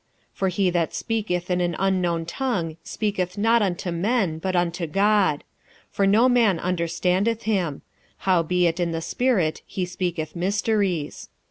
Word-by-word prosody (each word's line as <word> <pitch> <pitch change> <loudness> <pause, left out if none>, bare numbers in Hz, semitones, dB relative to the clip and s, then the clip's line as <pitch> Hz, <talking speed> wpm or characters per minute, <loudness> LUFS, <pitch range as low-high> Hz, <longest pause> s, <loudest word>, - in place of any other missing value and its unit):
46:014:002 - - -35
For 195 - +2
he 185 +1 +1
that 170 -2 0
speaketh 185 -6 -2
in 180 0 +1
an 175 -1 0
unknown 180 -4 0
tongue 170 - -2
speaketh 195 -3 -2
not 225 +3 +3
unto 185 -2 -1
men, 185 -2 0
but 185 +2 -2
unto 175 -1 0
God: 195 -3 +2 0.5
for 195 - +1
no 220 +5 +5
man 235 -7 +3
understandeth 180 +5 0
him; 180 -10 -1 0.4
howbeit 180 -1 +2
in 170 -1 0
the 165 - -2
spirit 205 -12 0
he 185 - -3
speaketh 175 -3 -3
mysteries. 195 -3 -1
180 Hz, 145 wpm, -24 LUFS, 170-205 Hz, 0.5 s, no